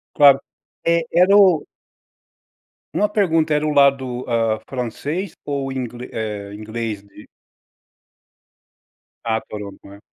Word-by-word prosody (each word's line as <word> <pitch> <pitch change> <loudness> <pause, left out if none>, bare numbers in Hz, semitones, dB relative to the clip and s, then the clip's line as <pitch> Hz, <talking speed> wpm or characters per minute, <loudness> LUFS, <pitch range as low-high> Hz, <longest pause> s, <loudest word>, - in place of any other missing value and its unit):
Claro! 140 -2 +7 0.5
É, 170 0 +3
era 180 +4 +5
o 185 -7 +5 1.3
uma 210 0 +2
pergunta: 165 -7 +2
era 150 +1 0
o 150 - 0
lado, 135 -3 +3
hã, 115 -2 +1
francês 140 - -3
ou 140 -2 -3
ingle 125 -1 -5
eh, 105 -2 -5
inglês 110 0 -5
de 100 +1 -16 2.0
Ah, 110 -1 +1
Toronto, 105 -2 -8
né? 100 +1 -13
130 Hz, 115 wpm, -20 LUFS, 110-155 Hz, 2.0 s, Claro